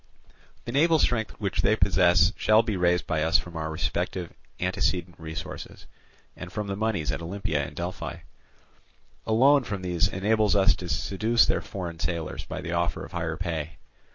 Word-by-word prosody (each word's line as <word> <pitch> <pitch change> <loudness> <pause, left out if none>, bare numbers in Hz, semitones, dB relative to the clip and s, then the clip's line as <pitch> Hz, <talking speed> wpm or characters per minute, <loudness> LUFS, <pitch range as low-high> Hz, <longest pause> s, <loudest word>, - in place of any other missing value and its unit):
The 120 - -4
naval 160 +5 +4
strength 115 -7 0
which 100 -2 -1
they 110 - +3
possess 90 -3 +4
shall 110 +1 +4
be 110 -3 -2
raised 90 -1 +2
by 80 - -1
us 80 +2 +4
from 85 -1 -7
our 80 -1 -3
respective 85 +3 -3 0.3
antecedent 90 -1 0
resources, 80 0 -7 0.5
and - - -8
from 105 - -3
the 100 -1 -3
moneys 105 -7 -1
at - - -3
Olympia 85 -4 -2
and 70 - -7
Delphi. 90 +1 -5 1.1
A - - -1
loan 135 +4 +5
from 100 -5 -5
these 90 -2 +1
enables 105 +2 +1
us 100 +1 +5
to 90 - -7
seduce 110 +8 +2
their - - +1
foreign 85 -4 -6
sailors 85 -2 -3
by - - -6
the 85 - -5
offer 85 0 -1
of - - -13
higher 85 -2 -3
pay. 80 -3 -4
90 Hz, 175 wpm, -26 LUFS, 85-105 Hz, 1.1 s, loan